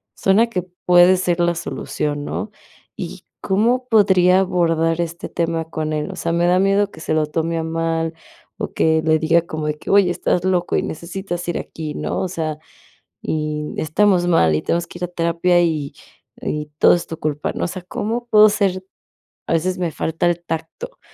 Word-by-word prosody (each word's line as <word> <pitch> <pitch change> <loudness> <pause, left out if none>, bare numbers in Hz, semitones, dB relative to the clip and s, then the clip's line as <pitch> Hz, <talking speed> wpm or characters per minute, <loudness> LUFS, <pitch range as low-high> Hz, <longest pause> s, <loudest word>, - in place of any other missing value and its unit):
suena 205 +5 +3
que 180 -5 -2 0.2
puede 180 +1 +6
ser 180 -1 0
la 175 0 +2
solución, 145 -3 -3
¿no?, 210 - -4 0.5
y, - - -7 0.2
¿cómo 235 +6 +1
podría 190 -4 +5
abordar 165 -3 +1
este 170 0 -5
tema 165 -1 -1
con 155 -1 -3
él?, 150 0 -2
o - - -8
sea, 165 - -2
me 170 +1 +2
da 180 +1 +4
miedo 195 +1 +2
que - - -13
se 155 - -2
lo 155 -1 +2
tome 165 +2 -1
a 165 - -1
mal, 165 0 -1 0.5
o - - -3
que 160 0 +2
le 160 0 +3
diga 165 +2 +3
como 155 -2 -5
de 150 - -1
que: - - -9
"Oye 195 -3 +5
estás 175 0 0
loco 180 -2 +1
y - - 0
necesitas 175 +2 -5
ir 175 - -1
aquí", 155 -2 -6
¿no?, - - -3
o - - -1
sea, 160 -4 -4 0.6
y 150 -1 -3
estamos 175 +3 +2
mal, 80 - +4
y 75 - 0
tenemos 170 0 -1
que 175 - -11
ir - - -5
a - - -7
terapia 175 +1 +2
y 155 -4 -1 0.5
y 150 0 -3
todo - - +7
es 175 - 0
tu 165 - -6
culpa, 150 -1 -2
¿no?, - - -2
o - - -1
sea, 185 +1 -6
¿cómo 230 +6 -3
puedo 215 0 +8
ser?, 195 -3 0 0.7
a - - 0
veces 180 +3 0
me 175 -2 -1
falta 160 +2 -2
el 175 0 -1
tacto 165 - -6
170 Hz, 200 wpm, -20 LUFS, 160-185 Hz, 0.7 s, puedo